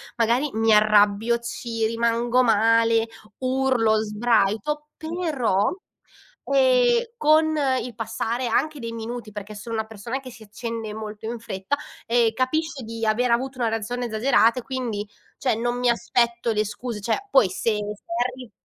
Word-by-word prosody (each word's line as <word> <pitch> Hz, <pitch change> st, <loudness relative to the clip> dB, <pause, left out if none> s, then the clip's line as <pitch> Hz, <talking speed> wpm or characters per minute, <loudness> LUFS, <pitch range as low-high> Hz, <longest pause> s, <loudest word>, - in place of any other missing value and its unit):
magari 240 Hz, +5 st, +2 dB
mi 225 Hz, 0 st, +3 dB
arrabbio, 210 Hz, +2 st, +4 dB
ci 235 Hz, -1 st, -3 dB
rimango 235 Hz, +2 st, +1 dB
male, 230 Hz, 0 st, +3 dB, 0.3 s
urlo, 255 Hz, -4 st, +2 dB
sbraito, 225 Hz, +6 st, 0 dB
però, 305 Hz, -, 0 dB, 0.8 s
ehm, -, -, +4 dB
con 315 Hz, +1 st, +4 dB, 0.3 s
il 240 Hz, 0 st, -6 dB
passare 230 Hz, +2 st, -2 dB
anche 305 Hz, +3 st, 0 dB
dei 230 Hz, -1 st, -5 dB
minuti, 230 Hz, -1 st, -6 dB
perché 205 Hz, +1 st, -7 dB
sono 225 Hz, +2 st, -6 dB
una 220 Hz, 0 st, -1 dB
persona 225 Hz, +4 st, -5 dB
che 255 Hz, -2 st, -10 dB
si 225 Hz, -2 st, -13 dB
accende 225 Hz, 0 st, -6 dB
molto 215 Hz, 0 st, -7 dB
in 235 Hz, +1 st, -4 dB
fretta, 220 Hz, +4 st, -3 dB, 0.3 s
ehm, 230 Hz, -1 st, +3 dB
capisce 275 Hz, +3 st, -1 dB
di 225 Hz, 0 st, -4 dB
aver 235 Hz, +3 st, +2 dB
avuto 255 Hz, +2 st, 0 dB
una 235 Hz, -, +1 dB
reazione 225 Hz, +3 st, -3 dB
esagerata 230 Hz, +1 st, +3 dB
e -, -, -9 dB
quindi, 235 Hz, -6 st, -3 dB, 0.3 s
cioè, 250 Hz, -4 st, +1 dB
non 240 Hz, +2 st, -1 dB
mi 245 Hz, -, +2 dB
aspetto 235 Hz, 0 st, +1 dB
le 215 Hz, 0 st, +1 dB
scuse, 210 Hz, +2 st, -5 dB
cioè, 395 Hz, -, -2 dB
poi 265 Hz, -, +6 dB
se 205 Hz, +5 st, -1 dB
se 210 Hz, 0 st, -5 dB, 0.2 s
arri 250 Hz, -3 st, -6 dB
230 Hz, 150 wpm, -24 LUFS, 220-255 Hz, 0.8 s, poi